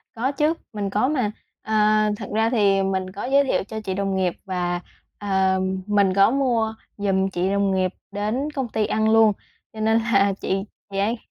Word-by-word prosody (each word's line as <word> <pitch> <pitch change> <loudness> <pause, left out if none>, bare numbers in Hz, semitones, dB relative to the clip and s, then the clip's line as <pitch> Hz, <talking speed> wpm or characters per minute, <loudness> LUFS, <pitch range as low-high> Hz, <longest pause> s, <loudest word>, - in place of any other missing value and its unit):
Có 245 +4 0
chứ, 300 +2 +1 0.2
mình 205 -2 -2
có, 210 +6 +1
mà, 255 -8 0 0.3
ờ, 220 - -5 0.4
thật 205 - -7
ra 220 +1 +2
thì 200 -5 +3
mình 190 -1 -2
có 200 +4 -6
giới 275 +2 +4
thiệu 265 - 0
cho 220 +2 -6
chị 190 -3 -3
đồng 195 0 -1
nghiệp 185 -2 +1
và, 175 -2 -2 0.4
ờm, 190 -1 0
mình 200 -2 +3
có 195 +3 +5
mua 240 -5 +1 0.2
giùm 195 -1 +1
chị 185 0 -1
đồng 200 0 +1
nghiệp 185 -1 +1 0.2
đến 220 +9 -2
công 270 -4 -3
ty 215 -1 0
ăn 220 +1 +1
luôn. 225 -1 +6 0.4
Cho 220 - -9
nên 220 +1 +3
là 200 -3 +2
chị, 195 0 -1 0.3
chị 195 - -4
ấy 215 +5 +1
205 Hz, 195 wpm, -23 LUFS, 190-225 Hz, 0.4 s, luôn